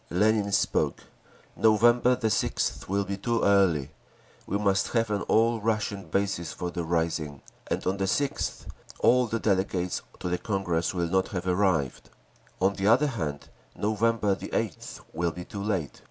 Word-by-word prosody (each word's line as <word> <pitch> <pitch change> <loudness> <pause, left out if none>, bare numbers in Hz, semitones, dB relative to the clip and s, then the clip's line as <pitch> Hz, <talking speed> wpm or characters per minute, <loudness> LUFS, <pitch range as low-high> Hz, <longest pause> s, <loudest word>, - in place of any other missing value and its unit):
Lenin 105 +2 +2
spoke: 100 - +1 0.5
"November 120 +4 +4
6th 110 -6 -1
will 100 +1 +1
be 100 +1 -4
too 115 +3 -1
early. 95 -9 +3 0.6
We 100 - 0
must 100 -2 +1
have 115 -2 +1
an 100 - 0
all 115 0 +3
Russian 105 -2 -1
basis 95 -2 -1
for 90 -1 -4
the 85 -1 -3
rising; 80 -3 -2 0.2
and - - -2
on 95 +1 0
the 95 - 0
6th 140 +8 -1 0.4
all 125 0 +4
the 115 +1 -2
delegates 95 -3 0 0.2
to - - -4
the 90 0 -1
Congress 95 -4 -1
will 85 -1 0
not 95 +2 +1
have 90 -2 -4
arrived…. 90 -7 0 0.5
On 95 +2 +3
the 100 0 -1
other 120 +7 +5
hand, 80 - -4 0.3
November 110 -1 +1
8th - - -4
will 85 +1 0
be 90 +1 -8
too 100 - -7
late. 95 -8 -2
100 Hz, 155 wpm, -27 LUFS, 90-110 Hz, 0.6 s, other